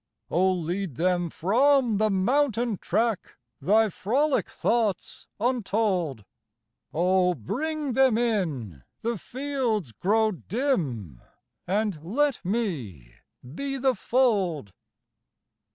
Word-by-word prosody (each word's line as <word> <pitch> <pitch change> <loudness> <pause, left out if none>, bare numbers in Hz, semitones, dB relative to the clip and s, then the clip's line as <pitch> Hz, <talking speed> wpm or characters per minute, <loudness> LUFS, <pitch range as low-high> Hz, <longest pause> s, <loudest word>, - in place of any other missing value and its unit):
Oh 185 +3 +3
lead 175 -2 -3
them 175 +2 +1
from 240 - +3
the 215 +1 +2
mountain 235 +2 +1
track 225 -3 -1 0.2
Thy 215 +8 +3
frolic 265 - 0
thoughts 220 -6 -1
untold. 200 - 0 0.7
Oh 180 +1 +2
bring 290 - -3
them 260 -3 +4
in 160 - -1 0.2
the 230 -2 -2
fields 250 - -2
grow 215 - +1
dim 160 - -2 0.5
And 200 -4 -1
let 275 - 0
me 145 - -3 0.3
be 275 - -4
the 265 0 +2
fold. 195 - 0
205 Hz, 95 wpm, -26 LUFS, 170-245 Hz, 0.7 s, them